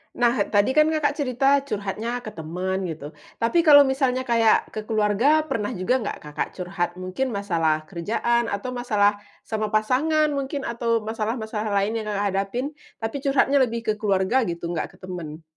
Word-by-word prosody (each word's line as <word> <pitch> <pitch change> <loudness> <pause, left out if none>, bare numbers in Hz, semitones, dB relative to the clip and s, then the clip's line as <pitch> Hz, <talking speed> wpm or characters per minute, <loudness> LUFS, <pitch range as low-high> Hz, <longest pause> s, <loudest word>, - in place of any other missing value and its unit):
Nah, 240 -1 +3 0.2
tadi 205 +4 +2
kan, 305 +3 +4
Kakak, 310 -2 +1
cerita 270 +1 +3
curhatnya 220 +3 -3
ke 215 - -6
teman 180 +4 -3
gitu 155 -3 -7 0.3
tapi 230 +9 +3
kalau 290 -2 +9
misalnya 265 -1 0
kayak 230 -3 +3
ke 215 -1 -6
keluarga, 225 +8 +3 0.3
juga 195 +8 +1
nggak, 220 - -4
Kakak, 150 0 -3
curhat? 180 -1 -2
Mungkin 185 +8 -3
masalah 165 -6 0
kerjaan 230 +6 0
atau 205 +4 -3
masalah 210 -5 +1 0.2
sama 215 -1 -2
pasangan 280 +9 +2
mungkin 280 0 -3
atau 230 -1 -1
masalah-masalah 220 0 -3
lain 220 +3 -1
yang, 215 - -5
Kakak, 205 -1 -1
hadapin 195 +6 -2 0.4
tapi 225 +5 -3
curhatnya 275 0 +2
lebih 235 -3 +1
ke 215 - +1
keluarga 205 +4 +1
gitu, 170 0 -4
nggak 170 - -4
ke - - -21
temen? 170 -4 -7
220 Hz, 160 wpm, -24 LUFS, 195-255 Hz, 0.4 s, kalau